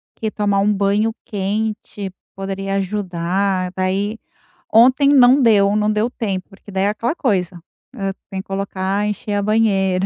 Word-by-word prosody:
que 220 - -3
tomar 205 -2 0
um 205 +1 +3
banho 205 +2 +1
quente 205 0 -3 0.2
poderia 195 0 -3
ajudar. 190 -1 -1
Daí 195 +4 -1 0.5
ontem 255 +5 +6
não 265 -1 +6
deu, 205 -4 +4
não 210 0 +2
deu 215 +3 0
tempo, 195 -6 -3
porque 195 +1 -16
daí 190 0 0
é - - +3
aquela 230 +7 -2
coisa, 185 - -1 0.4
hã, 195 -1 -2 0.2
tem 190 - -5
que 195 - -23
colocar, 195 +1 -2
encher 210 0 -4
a 205 - +1
banheira. 195 -4 +2
200 Hz, 155 wpm, -19 LUFS, 195-215 Hz, 0.5 s, ontem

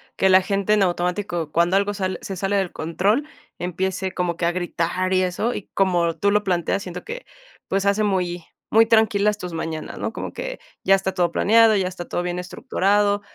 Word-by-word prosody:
que 190 - +2
la 185 0 +7
gente, 200 +2 0
en 210 - +3
automático, 175 -2 -1
cuando 170 +3 +2
algo 205 +1 0
sale 190 -2 -2
se 195 - -5
sale 195 +2 -1
del 190 -3 0
control, 200 - 0 0.3
empiece 185 +1 -2
como 175 -2 -2
que 170 - -1
a - - +2
gritar 180 +1 -1
y 185 - +3
eso. 185 +6 -1
Y 200 - -7
como 175 -4 +2
tú 200 - +2
lo 210 0 +2
planteas, 180 +1 0
siento 180 -1 -7
que, - - -7 0.4
pues, 195 +1 0
hace 200 +2 +2
muy 180 -4 -1 0.3
muy 225 +1 +5
tranquilas 210 -2 +3
tus 180 -4 -7
mañanas, 160 -1 -5
¿no? - - -2
Como - - -6
que - - -6 0.2
ya 195 - +5
está 190 0 -2
todo 175 -2 +1
planeado, 225 +3 +5
ya 190 -2 +1
está 180 -1 -7
todo 175 - -2
bien 180 0 -3
estructurado, 205 0 +1
190 Hz, 200 wpm, -22 LUFS, 175-205 Hz, 0.4 s, la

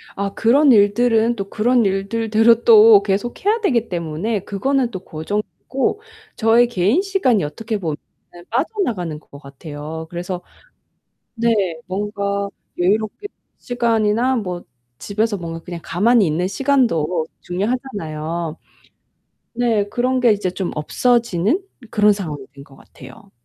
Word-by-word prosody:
아 200 0 -3
그런 270 +5 +4
일들은 225 +2 +3
또 195 -2 -5
그런 235 +1 +2
일들대로 225 +4 +2
또 220 -2 +8
계속 205 - -2
해야 440 +3 +3
되기 235 - +1
때문에 175 +5 -2
그거는 245 +5 0
또 190 - -5
고정이고 210 - -3 0.3
저의 230 +2 +4
개인 220 - +2
시간이 370 - +1
어떻게 215 +9 -4
보면은 160 -6 -3 0.5
빠져나가는 225 - -2
것 140 -2 -15
같아요. 150 +3 -8
그래서 175 +1 -5 0.9
네 235 +1 +1 0.4
뭔가 200 0 -2 0.3
여유롭게 215 - 0 0.3
시간이나 235 +1 +1
뭐 180 -6 -4 0.4
집에서 210 +1 -1
뭔가 165 -2 -6
그냥 175 0 -8
가만히 210 +2 +3
있는 170 +4 0
시간도 190 - +1 0.2
중요하잖아요. 175 - -3 1.0
네. 230 -4 +1
그런 255 +3 0
게 240 -3 +5
이제 200 -3 -1
좀 185 0 -3
없어지는 235 - +1 0.3
그런 210 -1 +4
상황이 155 -9 -5
된 140 0 -12
것 135 - -18
같아요. 205 +6 -15
210 Hz, 280 characters per minute, -20 LUFS, 175-235 Hz, 1.0 s, 또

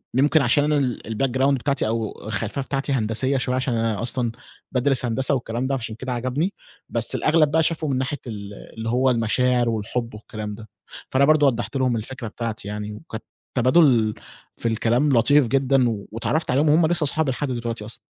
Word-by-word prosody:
يمكن 145 +4 +4
عشان 135 +3 +3
أنا 150 0 +2
ال 130 -4 -1
الbackground 130 +4 +1
بتاعتي 140 -1 0
أو 110 -1 -3
الخلفية 110 +5 -2
بتاعتي 135 +1 -2
هندسية 130 +3 +1
شوية 125 0 -1
عشان 130 -1 -1
أنا 115 -3 -1
أصلًا 120 0 0 0.4
بادرس 130 0 +1
هندسة 130 +4 +1
والكلام 120 0 -3
ده 135 - 0
فعشان 110 -3 -6
كده 130 +3 -5
عجبني، 130 +10 -1 0.4
بس 115 -1 +2
الأغلب 155 -1 +3
بقى 160 +1 +3
شافه 160 -1 -1
من 135 -3 0
ناحية 130 +2 -2
ال 100 -3 -7 0.2
اللي 115 0 -4
هو 130 +3 +2
المشاعر 120 +1 +2
والحب 115 +2 -3
والكلام 105 -1 -7
ده، 110 0 -12 0.4
فأنا 135 +1 +3
برضه 150 -1 +5
وضّحت 120 +1 -1
لهم 130 -2 +1
الفكرة 115 +2 -6
بتاعتي 110 -2 -5
يعني، 105 0 -5
وكانت 110 -1 -8 0.3
تبادل 125 -4 +4 0.4
في - - -1
الكلام 115 +5 +1
لطيف 140 +3 +4
جدًا، 135 +1 +2 0.3
واتعرّفت 140 +8 -1
عليهم 145 +4 +3
وهُم 160 +2 +5
لسه 170 -1 +1
أصحابي 150 -1 0
لحد 135 +1 -3
دلوقتي 115 -3 -4
أصلًا. 110 - -8
125 Hz, 180 wpm, -23 LUFS, 115-140 Hz, 0.4 s, برضه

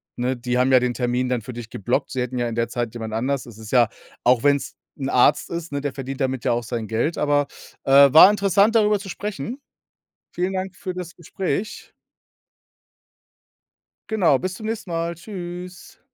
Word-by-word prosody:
ne, 125 +1 -1
die 125 +1 -2
haben 130 +1 +3
ja 130 - +7
den 125 0 -1
Termin 125 +1 -1
dann 125 -2 0
für 120 +3 -8
dich 120 -1 -8
geblockt. 115 +4 -2
Sie 130 - -2
hätten 125 0 -3
ja 120 - 0
in 115 - -4
der 115 0 0
Zeit 120 -1 -3
jemand 110 -2 -6
anders 130 +4 -1
es 115 -3 -12
ist 110 -1 -10
ja 120 -3 +4 0.3
auch 125 +1 +3
wenn's 140 -1 +1 0.2
'n 135 -1 -3
Arzt 135 +4 +3
ist, 170 -2 -5
ne, 140 0 -2
der 145 -2 -3
verdient 135 +1 -6
damit 130 -2 -1
ja - - +3
auch 120 0 0
sein 115 -1 -4
Geld, 115 +9 -1
aber, 145 -1 +2 0.4
äh, 140 0 +7
war 160 +5 +10
interessant, 200 +2 +3
darüber 210 -2 +4
zu 195 -1 -9
sprechen. 210 - -5 0.7
Vielen 180 +2 -1
Dank 185 0 -4
für 185 - -5
das 180 -2 -7
Gespräch. 190 +5 -4 2.2
Genau, 175 -11 +3
bis 185 0 -3
zum 215 - -9
nächsten 220 -4 -4
Mal, 170 0 -2
tschüss. 180 -1 -9
140 Hz, 195 wpm, -22 LUFS, 125-180 Hz, 2.2 s, war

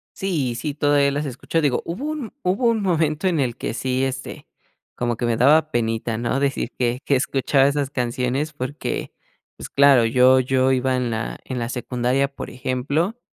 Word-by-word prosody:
Sí, 150 -11 -1
sí, 145 +4 -3
todavía 145 -1 +2
las 145 +2 -2
escucho, 140 +5 -2
digo, 140 -4 +1
hubo 210 - -4
un 300 -8 -4
hubo 195 +7 +1
un 225 -2 +1
momento 165 -2 +1
en 170 -4 +1
el 125 -4 0
que - - -4
sí, 130 +2 -1
este, 135 0 -5 0.5
como 120 -1 -1
que 120 - -3
me 115 -1 +1
daba 155 +5 +4
penita, 115 -1 -1
¿no?, 120 +3 -1
decir 140 -1 -1
que 125 0 0
que 140 - +3
escuchaba 135 +1 +2
esas 140 -1 -1
canciones 125 +4 -1
porque, 140 +2 -4 0.5
pues - - -8
claro, 140 -4 +5
yo 130 +3 +5
yo 130 +1 +2
iba 130 0 +1
en 125 -2 -1
la 110 0 -3
en 130 -2 -4
la 115 0 -3
secundaria, 125 +2 0
por - - -7
ejemplo, 140 - -2
135 Hz, 185 wpm, -22 LUFS, 125-150 Hz, 0.5 s, claro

